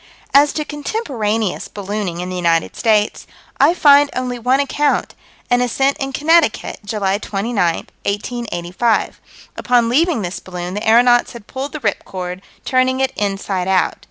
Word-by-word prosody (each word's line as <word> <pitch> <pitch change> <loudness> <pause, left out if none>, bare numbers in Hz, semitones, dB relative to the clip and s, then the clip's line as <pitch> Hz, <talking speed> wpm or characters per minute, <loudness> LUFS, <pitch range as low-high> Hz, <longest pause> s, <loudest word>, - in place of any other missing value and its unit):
As 285 +1 +6
to 305 - -2
contemporaneous 245 - -2
ballooning 200 -3 -4
in 180 - -5
the - - -4
United 170 -2 +1
States, 215 -2 +1 0.3
I 345 - +5
find 285 -3 +6
only 250 -1 -3
one 255 +3 +2
account: 285 +1 0 0.3
an 245 0 +2
ascent 270 +3 +1
in 270 0 -3
Connecticut, 310 -2 +2
July 205 -1 -1
29, 195 -5 -1 0.3
1885. 205 -1 -2 0.4
Upon 240 -2 +2
leaving 295 - +2
this 175 +1 -4
balloon, 180 -1 -6
the 210 +2 -4
aeronauts 240 +1 +4
had 235 -3 -11
pulled 270 +4 -6
the 305 - -4
"rip 205 -4 -1
cord," 180 -1 -6 0.2
"turning 260 0 +2
it 265 0 0
inside 195 -2 -2
out." 190 -1 +1
230 Hz, 150 wpm, -18 LUFS, 195-265 Hz, 0.4 s, As